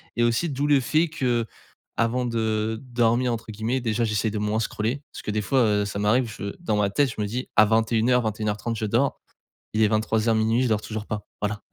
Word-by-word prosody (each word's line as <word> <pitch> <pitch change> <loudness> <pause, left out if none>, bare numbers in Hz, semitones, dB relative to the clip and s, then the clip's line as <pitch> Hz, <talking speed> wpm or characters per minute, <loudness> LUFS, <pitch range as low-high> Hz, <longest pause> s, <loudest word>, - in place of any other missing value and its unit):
et 120 - 0
aussi 120 +9 +1
d'où 140 0 -1
le 145 -2 +5
fait 155 +6 +2
qu'avant 120 -2 -2
de 110 -1 -1
«dormir» 120 +1 +2
entre 115 -1 -6
guillemets, 110 +5 -1
déjà 115 0 0
j'essaie 110 0 0
de 105 - -3
moins 105 +1 0
scroller, 115 +4 -2
parce - - -7
que - - -3
des 105 +1 0
fois, 135 +6 +1
heu, 105 -2 +2
ça 100 - -5
m'arrive, 115 +4 +2
je 100 0 -4
dans 175 -11 -1
ma 105 -1 +2
tête, 140 +7 +2
je - - -3
me - - 0
dis: 125 +5 -4
«À 110 - +7
21:00 115 +3 +2
21:30 110 +1 -2
je 110 - -2
dors». 120 +6 +1 0.5
Il 110 - +1
est 110 - +6
23:00-00:00 110 +2 +2
je - - +2
dors 110 -2 +1
toujours 110 -1 -5
pas. 105 -1 -4 0.2
Voilà, 105 0 -2
110 Hz, 215 wpm, -25 LUFS, 105-120 Hz, 0.5 s, À